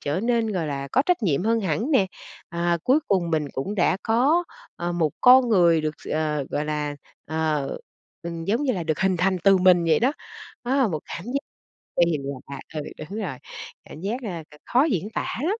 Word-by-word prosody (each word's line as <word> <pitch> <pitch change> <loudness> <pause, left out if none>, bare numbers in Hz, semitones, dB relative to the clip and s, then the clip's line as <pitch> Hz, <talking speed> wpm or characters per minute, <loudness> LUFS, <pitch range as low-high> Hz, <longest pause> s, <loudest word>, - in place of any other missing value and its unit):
trở 150 +6 -1
nên, 230 -2 +1
gọi 175 -5 -1
là, 140 -1 -4
có 265 - +4
trách 360 -8 +2
nhiệm 170 -3 +1
hơn 230 +1 +2
hẳn 210 - -1
nè, 210 -10 +4 0.4
à, 170 0 0
cuối 270 +5 +4
cùng 180 -4 +1
mình 155 -2 +1
cũng 165 +10 -3
đã 180 -2 +2
có, 275 +10 +3 0.3
ờ, 175 0 -2
một 165 -3 +1
con 250 0 +7
người 170 -6 +4
được 155 0 -2
s - - -9
ờ, 150 -2 -1
gọi 150 - -1
là, 150 -1 -2 0.3
ờ, 155 -2 0 0.6
ừm, 170 -1 -5
giống 225 - 0
như 265 - +1
là 180 - -2
được 155 0 -1
hình 190 0 +2
thành 185 +2 +1
từ 195 -1 +7
mình 180 -2 +5
vậy 160 -2 +4
đó. 255 +5 +3 0.5
Đó 255 +3 +1
là 265 -5 +3
một 155 -5 -3
cảm 170 - -7
giác 270 +3 -1 0.7
kỳ 160 -3 0 0.3
lạ. 140 -1 -6
Ừ, 155 - -2 0.3
đúng 205 - -4
rồi, 160 -10 -4 0.5
cảm 155 - -11
giác, 200 +6 -2
ờ, 175 -8 -5 0.2
c - - -55
khó 255 +4 +4
diễn 210 - -1
tả 225 - -3
lắm. - - 0
180 Hz, 215 wpm, -24 LUFS, 155-230 Hz, 0.7 s, con